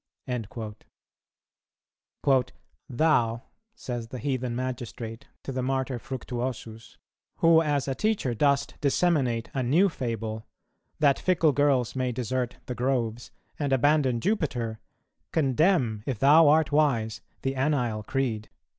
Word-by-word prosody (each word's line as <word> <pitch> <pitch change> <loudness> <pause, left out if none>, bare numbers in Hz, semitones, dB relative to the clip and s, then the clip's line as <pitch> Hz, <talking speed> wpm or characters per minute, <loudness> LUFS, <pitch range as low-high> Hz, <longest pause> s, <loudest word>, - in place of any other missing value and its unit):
"[228:3] 125 +3 -5 0.4
"Thou," 120 -5 +2 0.3
says 120 - -5
the 125 - -7
heathen 125 -1 -2
magistrate 120 -2 -5 0.2
to - - -5
the 130 -1 -2
Martyr 130 -1 -1
Fructuosus, 120 -3 -6 0.4
"who 165 -1 +5
as 145 -3 0
a 135 - 0
teacher 205 - 0
dost 140 +3 +1
disseminate 140 -6 +1
a 135 - -1
new 160 +11 +3
fable, 115 - -4 0.5
that 140 -2 +3
fickle 165 -4 +3
girls 140 -4 +2
may 130 -1 0
desert 125 +1 -2
the 125 - -4
groves 120 -2 -1 0.3
and 145 -2 -1
abandon 135 -2 +3
Jupiter, 125 - -1 0.5
condemn, 135 - +2
if 130 -5 -1
thou 150 +6 +6
art 155 +1 +4
wise, 120 -7 +1 0.2
the 135 - 0
anile 130 -6 0
creed." 110 -2 -2
130 Hz, 120 wpm, -27 LUFS, 120-145 Hz, 0.5 s, thou